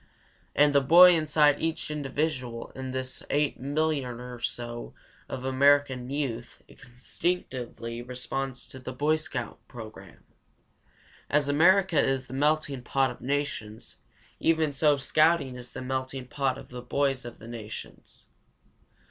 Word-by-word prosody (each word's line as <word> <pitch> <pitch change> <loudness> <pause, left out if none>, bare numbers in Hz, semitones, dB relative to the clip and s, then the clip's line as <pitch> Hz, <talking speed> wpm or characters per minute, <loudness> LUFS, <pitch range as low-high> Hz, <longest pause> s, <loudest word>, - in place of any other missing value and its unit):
And 145 0 +5
the 140 - +5
boy 175 +6 +8
inside 150 -2 +3
each 160 -1 -2
individual 135 -4 -3
in 130 0 -6
this 130 0 -4
8,000,000 145 -2 0
or 120 - -9
so 120 0 -5 0.3
of 130 - -5
American 130 -1 +3
youth 130 -5 -4
instinctively 125 -3 -4
responds 125 +1 -4
to 130 - -10
the 130 0 -7
Boy 150 +4 +2
Scout 125 -7 -5
program. 110 - -11 1.1
As 145 -1 +2
America 175 +2 +4
is 135 -1 0
the 130 - -10
melting 145 -1 +1
pot 135 +1 +1
of 125 - -11
the - - -9
nations, 140 -7 -3 0.4
even 160 -2 +2
so 145 +1 +3
scouting 155 -1 +2
is 125 -1 -7
the - - -6
melting 130 0 -3
pot 135 0 -1
of - - -11
the 125 0 -7
boys 135 +1 0
of 120 -1 -9
the 110 - -12
nations. 115 -2 -9
135 Hz, 135 wpm, -28 LUFS, 125-150 Hz, 1.1 s, boy